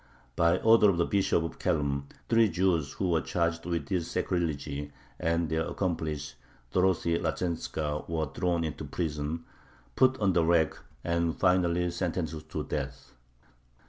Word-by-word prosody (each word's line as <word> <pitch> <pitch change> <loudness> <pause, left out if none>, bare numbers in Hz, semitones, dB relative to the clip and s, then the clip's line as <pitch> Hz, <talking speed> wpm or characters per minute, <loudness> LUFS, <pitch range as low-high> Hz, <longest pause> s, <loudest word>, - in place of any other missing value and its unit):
By 85 0 +4
order 110 -2 +6
of 95 - +1
the 85 - +3
Bishop 95 -4 +2
of 80 - -6
Khelm 70 -5 0 0.2
three 115 -2 +4
Jews 85 -5 +1
who 95 - -1
were 80 -1 +3
charged 85 +3 -1
with 85 -1 -2
this 90 -4 -1
sacrilege 85 -6 -1 0.5
and 85 0 +1
their 80 +1 -1
accomplice 80 -6 -2 0.4
Dorothy 90 -2 +2
Lazhentzka 80 -3 -2
were 80 -1 0
thrown 85 -1 0
into 80 -4 -4
prison, 80 -1 -3 0.5
put 130 0 +4
on 100 -3 +2
the 85 -1 +3
rack, 80 -2 +3 0.3
and 85 -1 0
finally 90 -1 +2
sentenced 85 -3 -3
to - - -3
death. - - -5
85 Hz, 145 wpm, -29 LUFS, 80-90 Hz, 0.5 s, order